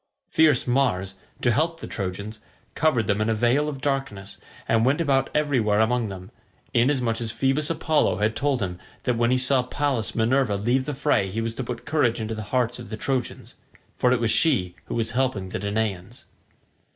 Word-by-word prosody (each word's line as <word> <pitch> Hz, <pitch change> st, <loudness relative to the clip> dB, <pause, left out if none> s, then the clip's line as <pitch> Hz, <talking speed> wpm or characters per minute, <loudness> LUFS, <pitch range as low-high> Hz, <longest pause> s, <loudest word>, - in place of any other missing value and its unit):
Fierce 155 Hz, -5 st, +4 dB
Mars, 120 Hz, -8 st, +1 dB, 0.3 s
to 120 Hz, -, +3 dB
help 165 Hz, +7 st, 0 dB
the -, -, -7 dB
Trojans, 100 Hz, +2 st, -5 dB, 0.3 s
covered 130 Hz, -9 st, +2 dB
them 100 Hz, +1 st, 0 dB
in 110 Hz, -, +1 dB
a 110 Hz, -, +1 dB
veil 125 Hz, +7 st, +2 dB
of 135 Hz, -3 st, -7 dB
darkness, 135 Hz, -9 st, -3 dB, 0.3 s
and 115 Hz, 0 st, +3 dB
went 135 Hz, +5 st, +2 dB
about 135 Hz, -5 st, +2 dB
everywhere 130 Hz, -9 st, +2 dB
among 115 Hz, 0 st, +1 dB
them, 95 Hz, -1 st, -9 dB, 0.4 s
inasmuch 120 Hz, -2 st, +2 dB
as 115 Hz, -, -2 dB
Phoebus 135 Hz, +6 st, +1 dB
Apollo 155 Hz, -, +1 dB
had 105 Hz, +2 st, 0 dB
told 135 Hz, -2 st, 0 dB
him 90 Hz, -1 st, -4 dB, 0.2 s
that 125 Hz, -, +1 dB
when 120 Hz, +1 st, +2 dB
he 130 Hz, -, +3 dB
saw 130 Hz, +1 st, +3 dB
Pallas 125 Hz, -3 st, -2 dB
Minerva 115 Hz, -1 st, +2 dB
leave 120 Hz, +6 st, 0 dB
the 150 Hz, -, -3 dB
fray 135 Hz, -8 st, +1 dB
he 105 Hz, +4 st, -4 dB
was 115 Hz, 0 st, -2 dB
to 130 Hz, -, -4 dB
put 120 Hz, 0 st, -6 dB
courage 125 Hz, -7 st, +1 dB
into 110 Hz, 0 st, -3 dB
the 110 Hz, -, -5 dB
hearts 125 Hz, -1 st, 0 dB
of 120 Hz, -, -9 dB
the 110 Hz, -, -5 dB
Trojans—for 125 Hz, 0 st, -3 dB
it 125 Hz, -, +2 dB
was 115 Hz, -1 st, +1 dB
she 100 Hz, -, +2 dB
who -, -, -5 dB
was 115 Hz, -1 st, -1 dB
helping 120 Hz, -6 st, -1 dB
the -, -, -4 dB
Danaans. 100 Hz, +1 st, -3 dB
120 Hz, 190 wpm, -24 LUFS, 110-135 Hz, 0.4 s, Fierce